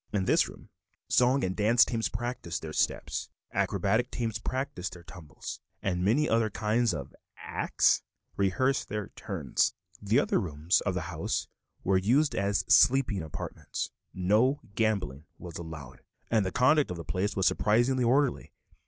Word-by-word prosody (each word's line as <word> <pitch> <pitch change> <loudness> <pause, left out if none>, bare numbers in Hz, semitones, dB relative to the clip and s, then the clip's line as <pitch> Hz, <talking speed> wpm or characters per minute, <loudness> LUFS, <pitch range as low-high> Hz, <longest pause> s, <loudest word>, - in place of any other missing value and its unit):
In 100 -3 0
this - - +3
room - - -14 0.4
song 130 +2 +3
and 95 0 -1
dance 110 +3 +5
teams 115 -2 -1
practiced 120 -10 -4
their 80 -1 -6
steps, - - -1 0.2
acrobatic 110 +5 +1
teams 115 -3 -3
practiced 120 -7 -3
their 90 - -12
tumbles, 80 -2 -9 0.2
and 90 -2 0
many 130 +11 +3
other 115 -1 +2
kinds 110 +3 +1
of - - -6 0.2
"acts" - - +1 0.3
rehearsed 130 +8 +1
their 105 -1 -4
"turns." 80 -10 -1 0.3
The 105 +6 +3
other 145 - +1
rooms 80 -1 +1
of 95 - 0
the 90 - -1
house 80 - -2 0.4
were 95 0 +3
used 130 +10 +2
as 100 +1 0
sleeping 120 -3 +4
apartments. 75 -3 -5 0.2
No 110 +10 +2
gambling 100 - -1
was 85 -2 -8
allowed, 80 -6 -9 0.3
and 110 -3 +3
the 95 - -2
conduct 150 +6 +3
of 90 - -4
the 85 - -7
place 100 +3 -1
was 95 -2 +1
surprisingly 120 +6 +2
orderly. 130 +3 +1
105 Hz, 155 wpm, -29 LUFS, 90-120 Hz, 0.4 s, dance